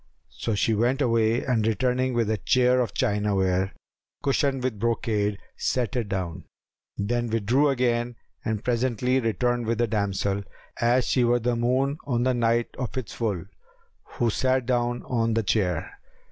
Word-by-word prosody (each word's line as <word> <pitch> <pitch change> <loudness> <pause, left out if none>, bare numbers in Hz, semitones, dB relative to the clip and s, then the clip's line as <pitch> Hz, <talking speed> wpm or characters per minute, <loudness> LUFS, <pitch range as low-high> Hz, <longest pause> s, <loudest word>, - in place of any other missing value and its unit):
So 110 - -2
she 110 +3 +2
went 120 +5 +1
away 115 -3 +2
and 115 -4 +1
returning 125 +3 +1
with 115 -2 +1
a 110 - +1
chair 125 +5 +3
of 115 -5 -3
chinaware, 100 -5 +1 0.5
cushioned 140 -2 +1
with 125 -5 -2
brocade, 105 -3 0 0.2
set 125 -4 -1
it 115 -5 -1
down: 90 -4 -3 0.5
then 120 +3 -1
withdrew 115 +7 +2
again 120 -2 0 0.3
and 110 -1 -2
presently 125 +1 +1
returned 120 0 0
with 115 0 0
a 120 - +4
damsel, 100 -2 -1 0.4
as 120 +1 +3
she 125 - +2
were 120 0 +3
the 120 0 0
moon 130 +5 +1
on 120 -3 +1
the 130 0 +2
night 120 -1 +1
of 130 +1 -4
its 125 -6 -4
full, 100 -7 -2 0.7
who 120 -2 +1
sat 130 +2 +1
down 120 -1 0
on 115 -2 0
the 115 - +1
chair. 95 -6 0
120 Hz, 160 wpm, -25 LUFS, 110-125 Hz, 0.7 s, a